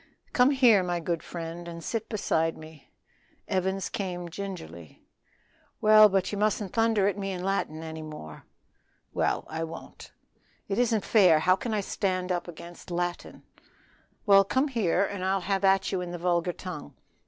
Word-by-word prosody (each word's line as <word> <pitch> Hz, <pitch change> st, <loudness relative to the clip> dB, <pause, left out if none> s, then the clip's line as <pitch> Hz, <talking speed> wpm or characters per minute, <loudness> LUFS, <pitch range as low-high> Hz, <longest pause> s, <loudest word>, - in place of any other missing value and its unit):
"Come 250 Hz, +1 st, +5 dB
here, 250 Hz, -8 st, +5 dB
my 175 Hz, -1 st, -1 dB
good 170 Hz, -1 st, -2 dB
friend, 170 Hz, 0 st, -7 dB
and 170 Hz, -1 st, -8 dB
sit 225 Hz, +3 st, -3 dB
beside 165 Hz, -7 st, 0 dB
me." 155 Hz, -2 st, -13 dB, 0.6 s
Evans 190 Hz, +1 st, -1 dB
came 180 Hz, -5 st, -4 dB
gingerly. 160 Hz, -, -8 dB, 0.8 s
"Well, 215 Hz, 0 st, +7 dB
but 195 Hz, -1 st, 0 dB
ye 205 Hz, -, -3 dB
mustn't 210 Hz, -2 st, 0 dB
thunder 225 Hz, -3 st, +3 dB
at 205 Hz, 0 st, -1 dB
me 195 Hz, 0 st, -3 dB
in 180 Hz, -1 st, -5 dB
Latin 175 Hz, -5 st, -2 dB
any 160 Hz, 0 st, -6 dB
more." 150 Hz, -, -9 dB, 0.7 s
"Well, -, -, 0 dB
I 160 Hz, +1 st, -4 dB
won't." 165 Hz, 0 st, -9 dB, 0.6 s
"It 195 Hz, -, -1 dB
isn't 230 Hz, -4 st, +1 dB
fair; 185 Hz, -8 st, +5 dB
how 185 Hz, +4 st, +4 dB
can 230 Hz, +4 st, -5 dB
I 215 Hz, -1 st, 0 dB
stand 185 Hz, -2 st, -2 dB
up 175 Hz, -1 st, -2 dB
against 170 Hz, +1 st, -11 dB
Latin?" 175 Hz, 0 st, -4 dB, 0.8 s
"Well, 195 Hz, -2 st, +7 dB
come 260 Hz, +8 st, 0 dB
here 200 Hz, -6 st, +1 dB
and 195 Hz, -1 st, -5 dB
I'll 190 Hz, +1 st, +1 dB
have 195 Hz, +2 st, -1 dB
at 195 Hz, 0 st, +3 dB
you 190 Hz, -2 st, -1 dB
in 180 Hz, -, -5 dB
the 175 Hz, -, -5 dB
vulgar 175 Hz, 0 st, 0 dB
tongue. 180 Hz, -, -8 dB
185 Hz, 165 wpm, -27 LUFS, 170-200 Hz, 0.8 s, Well